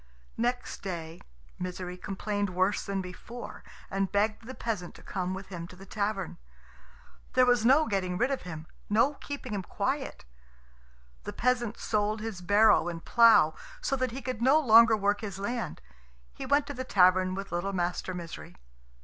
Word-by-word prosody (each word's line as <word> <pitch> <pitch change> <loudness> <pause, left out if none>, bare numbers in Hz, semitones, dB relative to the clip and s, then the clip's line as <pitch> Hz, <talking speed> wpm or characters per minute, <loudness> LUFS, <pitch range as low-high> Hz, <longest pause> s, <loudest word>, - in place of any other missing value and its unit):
Next 245 +2 -2
day 170 -3 -6 0.4
Misery 180 0 -5
complained 205 +2 -3
worse 185 +3 +1
than 195 -1 -2
before, 235 +7 -9 0.3
and 195 0 -1
begged 215 +2 0
the 260 - -7
peasant 205 -7 -4
to - - -14
come 185 0 -3
with 190 0 -9
him 170 -3 -6
to 180 - -13
the 190 +2 -12
tavern. 200 -2 -3 0.9
There 255 0 +5
was 245 -2 +3
no 285 +5 +6
getting 185 -5 -1
rid 245 +6 +1
of 275 - -1
him, 160 -3 -7 0.2
no 225 +8 +3
keeping 280 -4 -7
him 200 - -1
quiet. 265 - -3 1.0
The - - -6
peasant 240 -2 0
sold 210 0 0
his 215 -4 -5
barrow 205 +2 +5
and 170 -1 -5
plough, 230 -9 +6 0.3
so 275 - 0
that 255 -1 -1
he 260 +2 -7
could 255 -3 -4
no 270 +5 +5
longer 230 -4 +7
work 205 0 +1
his 200 -4 -5
land. 225 - -3 0.5
He - - -7
went 285 +1 +3
to 285 - -6
the 260 -1 -4
tavern 185 -4 +4
with 195 0 -6
little 175 +3 -1
Master 180 0 -2
Misery. 165 - -8
205 Hz, 170 wpm, -29 LUFS, 185-240 Hz, 1.0 s, longer